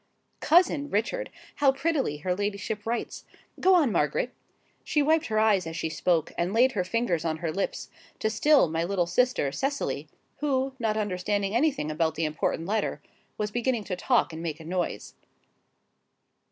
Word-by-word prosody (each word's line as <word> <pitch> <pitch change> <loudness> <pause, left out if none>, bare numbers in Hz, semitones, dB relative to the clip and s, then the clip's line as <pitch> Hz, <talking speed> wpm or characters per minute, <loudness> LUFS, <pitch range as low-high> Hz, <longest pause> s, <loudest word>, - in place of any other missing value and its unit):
COUSIN 310 -3 +3
Richard, 380 - -1 0.3
how 280 -2 +5
prettily 275 - -1
her 180 +5 -1
ladyship 205 +1 -3
writes! 235 +1 -3 0.4
Go 375 +1 +5
on, 300 -9 +4
Margaret!" 170 - 0 0.5
She 295 - +1
wiped 315 +2 +2
her 215 -1 -1
eyes 210 -5 +3
as 165 0 -5
she 160 - -2
spoke: 165 -1 +1
and 175 +3 0
laid 255 +3 +5
her 200 -7 -1
fingers 185 -4 0
on 160 -1 -1
her 160 0 -3
lips, 195 +4 -3 0.3
to - - -1
still 290 - +4
my 165 +1 -1
little 180 0 0
sister, 180 - +1
Cecily, 275 - -2 0.3
who, 270 -2 0
not 220 -2 0
understanding 205 0 -1
anything 265 - +1
about 160 0 0
the 165 - 0
important 155 +1 -1
letter, 215 +1 -1 0.4
was 210 0 -2
beginning 240 0 0
to 190 - -3
talk 230 -1 +1
and 160 - -6
make 165 -2 -4
a 160 - -11
noise. 180 +1 -3
210 Hz, 165 wpm, -27 LUFS, 170-260 Hz, 0.5 s, how